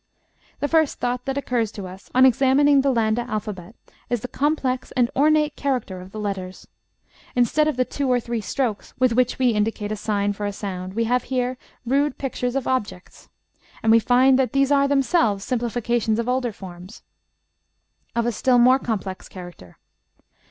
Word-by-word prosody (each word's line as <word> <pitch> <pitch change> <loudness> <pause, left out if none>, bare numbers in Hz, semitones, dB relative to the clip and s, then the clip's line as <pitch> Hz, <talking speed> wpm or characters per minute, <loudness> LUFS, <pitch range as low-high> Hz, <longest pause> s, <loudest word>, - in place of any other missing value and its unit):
The 290 - +1
first 315 -1 +2
thought 250 0 -2
that 270 0 -2
occurs 240 -6 -1
to 200 - -7
us 185 +2 -11
on 255 +1 +7
examining 270 +3 +4
the 275 - +1
Landa 230 -2 +1
alphabet 210 -2 -5 0.3
is 240 -3 -1
the 250 - -4
complex 270 -2 -1
and 245 -2 +1
ornate 300 +1 +3
character 250 -10 -2
of 185 +1 -12
the 215 - -7
letters. 190 -3 -5 0.7
Instead 250 +5 +3
of 300 -5 -1
the 255 - +2
two 280 0 -3
or 250 - +3
three 235 -1 -3
strokes 220 0 -3
with 255 -2 +3
which 250 +1 +1
we 255 -1 +3
indicate 210 -1 -1
a - - -1
sign 205 -1 -1
for 205 0 -4
a - - -2
sound, 185 -2 -6
we 230 - +1
have 245 +2 0
here 255 0 -1 0.3
rude 275 +3 +1
pictures 250 -2 -3
of 275 - -1
objects. 210 -8 -4 0.5
And 225 - +4
we 230 - +7
find 255 +3 +4
that 255 -4 0
these 275 0 +2
are 280 -1 +4
themselves 275 - +1
simplifications 235 -2 -1
of 235 0 -2
older 250 -1 0
forms 185 0 -11 1.1
of 235 -1 +1
a 240 - +1
still 250 +3 +2
more 255 +2 +5
complex 200 -6 -4
character. 175 - -11
245 Hz, 180 wpm, -23 LUFS, 210-265 Hz, 1.1 s, on